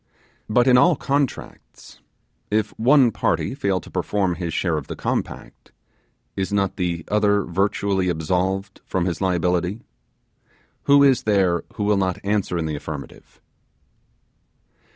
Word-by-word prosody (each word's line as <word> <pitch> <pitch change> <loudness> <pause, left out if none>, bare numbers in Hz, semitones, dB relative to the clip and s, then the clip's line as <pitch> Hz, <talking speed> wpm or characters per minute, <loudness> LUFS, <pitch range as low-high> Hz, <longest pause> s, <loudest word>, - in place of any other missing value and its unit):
But 120 +3 +3
in 125 -1 +6
all 170 +5 +5
contracts, 140 0 -4 0.5
if 105 0 0
one 130 +1 +5
party - - -1
fail 100 -9 -1
to - - -14
perform 95 -3 0
his 85 -1 -4
share 85 0 0
of 75 -3 -4
the - - -6
compact, - - -5 0.6
is 95 +1 -2
not 100 -1 0
the 85 -4 -2
other 105 -1 +2
virtually 95 +1 0
absolved 90 +4 -2
from 90 -2 -2
his 90 -1 -3
liability? 90 +2 0 1.0
Who 140 0 +6
is 135 -3 +4
there 95 -5 +1
who 105 - -2
will 105 0 +2
not 95 -2 0
answer 100 -3 -1
in 85 - -2
the 80 -1 -3
affirmative? 75 -1 -9
95 Hz, 135 wpm, -22 LUFS, 90-105 Hz, 1.0 s, in